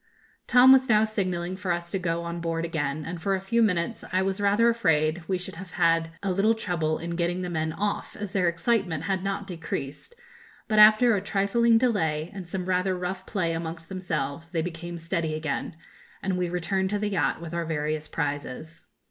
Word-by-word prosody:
Tom 250 +1 +7
was 265 -1 +5
now 215 -1 +5
signalling 185 -4 -2
for 185 -1 -3
us 170 0 -3
to 195 - -1
go 170 -1 -1
on 170 0 -4
board 165 0 -1
again, 150 -2 -2
and 165 0 -6
for 195 +3 +1
a - - -2
few 215 +5 +1
minutes 200 0 0
I 185 +1 +2
was 195 +1 -1
rather 205 +3 +4
afraid 165 -8 +2
we 190 - 0
should 180 -2 -8
have 190 0 -8
had 165 0 +2
a 195 - 0
little 205 +5 +3
trouble 165 -7 -1
in 170 +1 -5
getting 175 +1 -1
the 180 - -4
men 160 -1 -1
off, 205 +5 -3
as 205 -2 -5
their 190 -4 +1
excitement 170 -3 0
had 190 0 -1
not 195 0 -2
decreased; 165 - -6 0.5
but 215 -2 +2
after 215 +2 +7
a 195 - -1
trifling 220 +4 +3
delay 165 -10 0
and 185 -3 -8
some 185 0 -3
rather 185 0 +1
rough 185 +1 -4
play 170 -6 -1
amongst 165 0 -5
themselves, 165 -4 -3
they 165 -2 -1
became 170 0 -6
steady 165 -1 -2
again, 155 0 -3 0.5
and 190 -1 0
we 180 -1 -1
returned 190 +2 -1
to 205 - 0
the 205 0 -1
yacht 195 -5 0
with 170 0 -8
our 170 -1 -2
various 155 -1 -2
prizes. 145 +1 -4
180 Hz, 200 wpm, -26 LUFS, 165-200 Hz, 0.5 s, Tom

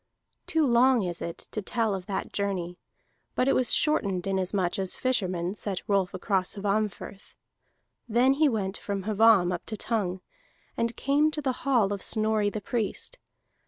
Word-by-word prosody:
Too 320 -3 +2
long 245 -1 +4
is 175 -2 -4
it 170 - -4
to 215 - -2
tell 225 0 -1
of 185 -2 -5
that 195 -2 -4
journey, 185 -3 -2 0.6
but 255 - +1
it - - +4
was 255 - +2
shortened 200 - +2
inasmuch 190 -1 0
as 190 -1 0
fishermen 185 -8 -1
set 200 -3 -4
Rolf 195 -3 +1
across 185 0 -1
Hvammfirth. 205 -1 -3 0.7
Then 245 +4 +4
he 300 +1 +3
went 200 -4 -2
from 200 -2 -4
Hvamm 210 -3 +4
up 175 - -4
to 215 - -3
Tongue, 195 -5 -2 0.5
and 230 0 -1
came 290 +3 +2
to 305 0 -4
the 260 -1 +1
hall 225 -7 +3
of 200 - -5
Snorri 215 -1 +1
the 210 +1 -5
Priest. 240 - -2
205 Hz, 160 wpm, -27 LUFS, 190-240 Hz, 0.7 s, long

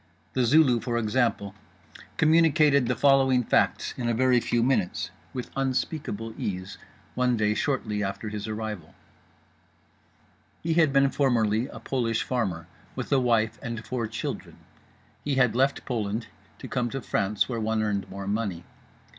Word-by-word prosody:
The 130 -2 +2
Zulu, 130 -2 +5
for 120 0 -2
example 110 -3 0 0.6
communicated 155 -4 +4
the - - +1
following 135 -3 +4
facts - - +1
in 120 -1 -2
a 115 - +1
very 125 0 +4
few 120 0 0
minutes, 125 -8 0 0.2
with 125 -2 -6
unspeakable 130 -4 -2
ease, 95 0 -4 0.3
one 125 -1 +1
day 105 -1 +2
shortly 105 -5 -1
after 100 +2 -4
his 105 0 -5
arrival: 105 -6 -5 1.7
He 165 0 +1
had 160 -3 +4
been 135 0 +4
formerly 120 -4 +1
a 110 - -10
Polish 115 -2 -1
farmer, 95 -10 -2 0.3
with 125 +1 -5
a 140 - +5
wife 115 -3 +1
and 115 -3 -5
four 120 -3 -2
children. 110 - -5 0.7
He 145 -2 -1
had 125 -3 +3
left 135 +2 +1
Poland 110 -2 -2 0.3
to - - -8
come 120 -1 -1
to 135 +3 -4
France, 100 +1 0
where 120 -3 -3
one 110 0 0
earned 100 -3 -2
more 100 0 -6
money. 100 -4 -2
120 Hz, 150 wpm, -26 LUFS, 105-130 Hz, 1.7 s, Zulu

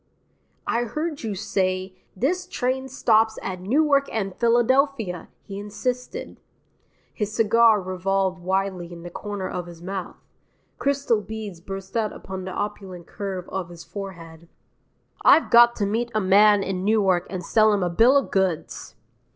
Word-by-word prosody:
"I 240 +1 0
heard 305 +6 -4
you 215 -3 -3
say, 185 -1 -1 0.2
This 360 - -1
train 260 -5 -2
stops 225 -4 +2
at 185 -1 -4
Newark 280 +6 +2
and 195 -4 -2
Philadelphia," 240 - +1
he 195 0 -7
insisted. 250 +5 -4 0.7
His 210 -1 -3
cigar 225 0 +5
revolved 185 0 -1
wildly 190 -1 -2
in 170 -1 -10
the 175 - -8
corner 205 0 -5
of 180 -1 -5
his 170 -1 -11
mouth; 185 +1 -5 0.6
crystal 275 -6 +1
beads 210 -4 -7
burst 195 +2 -8
out 220 -2 0
upon 190 -1 -7
the 185 - -5
opulent 190 -3 -5
curve 190 -3 -5
of 190 -2 -4
his 170 -1 -11
forehead. 170 -2 -9 0.8
"I've 325 - +5
got 235 0 +7
to 205 - -1
meet 230 +4 -1
a - - +3
man 205 +1 +5
in 185 -1 -3
Newark 195 -4 +2
and 180 -3 -5
sell 215 -1 +4
him 205 -3 +1
a 175 - 0
bill 240 +10 +5
of 275 - -1
goods." 190 -5 -2
200 Hz, 150 wpm, -24 LUFS, 185-230 Hz, 0.8 s, got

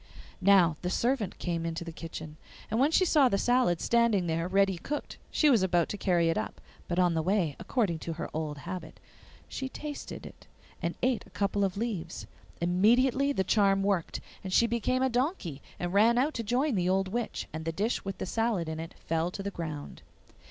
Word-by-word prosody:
Now 180 -5 +5
the 180 - -2
servant 230 -1 0
came 170 -2 -2
into 165 0 -3
the 165 - -6
kitchen, 160 -1 -8 0.3
and 220 - +1
when 275 +3 +4
she 370 +3 +3
saw 295 -6 +5
the 200 - +1
salad 245 -8 +2
standing 235 -6 +2
there 165 +1 -1
ready 195 -1 +2
cooked 295 - -5
she 305 - +3
was 245 -8 +5
about 175 -3 +2
to - - -3
carry 175 -4 +2
it 165 - +1
up, - - -5 0.3
but 175 - -2
on 180 -2 +4
the 160 - +1
way, 175 -4 +1
according 200 -11 0
to 165 - -4
her 160 - -4
old 155 -2 -3
habit, 175 +5 -7 0.5
she 265 -1 -4
tasted 295 +1 -7
it - - -13 0.3
and 170 - -2
ate 255 -2 +1
a - - -17
couple 200 0 0
of 195 -1 -1
leaves. 200 -7 -3 0.3
Immediately 240 +10 +3
the 190 - +1
charm 195 0 +3
worked, 195 -4 0 0.2
and 190 - -5
she 235 - +5
became 235 +3 0
a - - +4
donkey, 245 - -1 0.2
and 175 0 -3
ran 225 +4 +5
out 285 +5 +2
to 235 - -2
join 250 +6 +1
the 180 -3 +1
old 190 +1 +2
witch, 235 +4 -3
and 160 0 -4
the 165 - -1
dish 205 +8 -1
with 195 -1 -5
the - - -3
salad 220 -4 0
in 160 0 -4
it 165 0 -7
fell 165 +1 0
to 195 +2 -6
the 200 - -3
ground. 155 -5 -6
195 Hz, 210 wpm, -29 LUFS, 170-235 Hz, 0.5 s, Now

